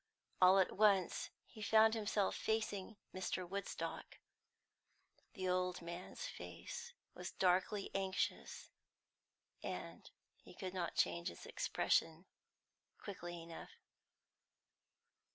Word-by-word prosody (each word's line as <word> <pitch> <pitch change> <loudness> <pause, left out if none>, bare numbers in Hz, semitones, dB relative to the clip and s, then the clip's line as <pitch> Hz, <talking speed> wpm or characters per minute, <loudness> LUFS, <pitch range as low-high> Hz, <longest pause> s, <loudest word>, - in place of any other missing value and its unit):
All 185 +1 +9
at 190 - +3
once 200 -3 +4 0.2
he 215 - -12
found 220 +1 +6
himself 210 -2 +1
facing 215 -1 -1 0.2
Mr. 185 -1 -2
Woodstock. 200 +2 -4 1.2
The 185 -2 -2
old 180 -1 +1
man's 175 - -6
face 480 -1 -7 0.2
was - - -6
darkly 185 +2 +2
anxious, 190 -1 -1 0.9
and - - -5 0.3
he - - -15
could 185 -2 -4
not 180 -2 -2
change 85 0 +2
its 85 - -10
expression 165 +3 +1 0.7
quickly 175 -4 -6
enough. 165 0 -9
190 Hz, 100 wpm, -39 LUFS, 180-205 Hz, 1.2 s, All